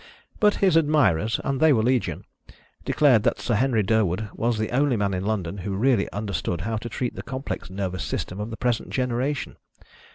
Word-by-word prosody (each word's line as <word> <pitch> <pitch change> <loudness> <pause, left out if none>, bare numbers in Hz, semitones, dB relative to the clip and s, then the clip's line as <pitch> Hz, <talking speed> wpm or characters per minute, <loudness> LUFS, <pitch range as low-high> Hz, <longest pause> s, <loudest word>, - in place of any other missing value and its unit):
But 210 -1 +4
his 185 - +4
admirers 125 - +3
and 135 -1 -1
they 160 +1 +5
were 110 -5 +3
legion 125 0 0 0.6
declared 130 -7 +4
that 120 +2 0
Sir 120 - -1
Henry 115 -1 +2
Durwood 105 -1 +1
was 115 0 0
the 110 0 -2
only 135 0 +2
man 100 -1 0
in 90 0 -2
London 100 -3 -2
who 95 +1 -3
really 125 +5 +2
understood 100 -4 -3
how 110 +4 -2
to 120 +2 -6
treat 120 +2 -3
the - - -6
complex 130 -8 -5
nervous 95 -1 -3
system 90 - -4
of 105 +2 -4
the 115 - -6
present 120 -3 -1
generation. 130 +2 -2
115 Hz, 190 wpm, -24 LUFS, 100-130 Hz, 0.6 s, they